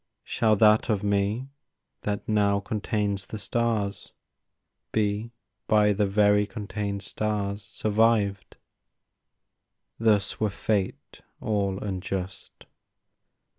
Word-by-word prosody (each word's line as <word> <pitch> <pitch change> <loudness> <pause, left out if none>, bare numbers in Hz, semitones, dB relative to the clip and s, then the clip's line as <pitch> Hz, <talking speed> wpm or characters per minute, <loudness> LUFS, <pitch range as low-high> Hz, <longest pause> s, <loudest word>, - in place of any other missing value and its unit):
Shall 110 -2 +2
that 110 +3 +5
of 105 -2 +1
me 100 +5 0 0.5
that 105 -1 -3
now 100 -2 +3
contains 100 -1 -2
the 110 - -6
stars 110 -2 -1 0.8
Be 105 +1 0 0.4
by 105 -1 +4
the 100 0 +1
very 105 +1 +3
contained 100 -2 -4
stars 105 -1 -2
survived? 105 -1 +1 1.4
Thus 110 -3 +2
were 110 - +1
Fate 100 -1 -2 0.2
all 100 -3 0
unjust. 95 -1 -5
105 Hz, 95 wpm, -26 LUFS, 100-110 Hz, 1.4 s, that